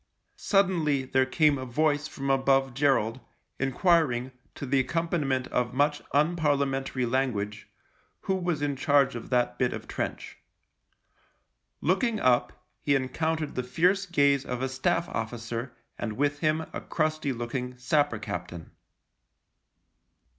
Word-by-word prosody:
Suddenly 170 Hz, -9 st, +2 dB
there 130 Hz, 0 st, +2 dB
came 150 Hz, 0 st, +3 dB
a -, -, -4 dB
voice 150 Hz, +3 st, +1 dB
from 135 Hz, -3 st, -3 dB
above 135 Hz, -1 st, +2 dB
Gerald, 130 Hz, -4 st, +1 dB, 0.4 s
enquiring, 135 Hz, -2 st, +2 dB, 0.2 s
to -, -, -6 dB
the 135 Hz, 0 st, +2 dB
accom 165 Hz, +4 st, -2 dB
paniment 135 Hz, -6 st, 0 dB
of 125 Hz, 0 st, -1 dB
much 145 Hz, +2 st, +2 dB
unparliamentary 140 Hz, -4 st, +1 dB
language, 115 Hz, -5 st, -2 dB, 0.5 s
who 190 Hz, -, -1 dB
was 175 Hz, -5 st, -1 dB
in 145 Hz, -1 st, 0 dB
charge 140 Hz, 0 st, +3 dB
of 120 Hz, -, -7 dB
that 125 Hz, -1 st, +1 dB
bit -, -, +1 dB
of -, -, -7 dB
trench. -, -, -5 dB, 1.4 s
Looking 215 Hz, +6 st, +1 dB
up, 125 Hz, -1 st, +1 dB, 0.2 s
he 140 Hz, -, +2 dB
encountered 155 Hz, +4 st, -1 dB
the 125 Hz, -, -1 dB
fierce 180 Hz, +10 st, +1 dB
gaze 140 Hz, -5 st, +3 dB
of 125 Hz, -1 st, -4 dB
a 130 Hz, -, 0 dB
Staff 170 Hz, +6 st, 0 dB
officer 115 Hz, +2 st, -4 dB, 0.3 s
and 110 Hz, -2 st, -3 dB
with 145 Hz, +4 st, 0 dB
him 155 Hz, 0 st, +1 dB
a -, -, -4 dB
crusty 155 Hz, -3 st, -1 dB
looking 125 Hz, +1 st, -4 dB
sapper 135 Hz, 0 st, +1 dB
captain. 90 Hz, -4 st, -6 dB
135 Hz, 130 wpm, -27 LUFS, 125-155 Hz, 1.4 s, came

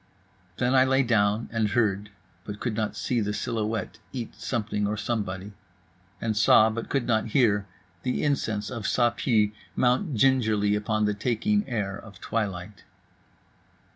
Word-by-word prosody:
Then 125 Hz, +1 st, +1 dB
I 130 Hz, -1 st, +6 dB
lay 135 Hz, +1 st, +3 dB
down, 110 Hz, -2 st, +2 dB
and 115 Hz, -2 st, +1 dB
heard 105 Hz, -2 st, +1 dB, 0.3 s
(but 105 Hz, +1 st, -7 dB
could 120 Hz, -, -2 dB
not 110 Hz, -1 st, -2 dB
see 120 Hz, -2 st, 0 dB
the 105 Hz, 0 st, -1 dB
silhouette 110 Hz, 0 st, -3 dB
eat 120 Hz, -4 st, -5 dB
something 110 Hz, -2 st, -2 dB
or 105 Hz, +1 st, -2 dB
somebody)… 100 Hz, -3 st, -3 dB, 0.7 s
and 110 Hz, -1 st, -1 dB
saw, 110 Hz, +1 st, +6 dB
but 115 Hz, +1 st, -5 dB
could 135 Hz, -4 st, 0 dB
not 110 Hz, -1 st, +1 dB
hear, 105 Hz, -6 st, +3 dB, 0.3 s
the 125 Hz, -, -1 dB
incense 110 Hz, -8 st, -1 dB
of 115 Hz, -4 st, -5 dB
Ça 120 Hz, -1 st, +2 dB
Pue 110 Hz, -5 st, +2 dB, 0.2 s
mount 130 Hz, +5 st, +1 dB
gingerly 110 Hz, -5 st, +3 dB
upon 105 Hz, +1 st, 0 dB
the 105 Hz, -, +1 dB
taking 130 Hz, -, 0 dB
air 100 Hz, -5 st, -2 dB
of 100 Hz, -2 st, -12 dB
twilight. 100 Hz, -3 st, -3 dB
110 Hz, 150 wpm, -26 LUFS, 105-120 Hz, 0.7 s, I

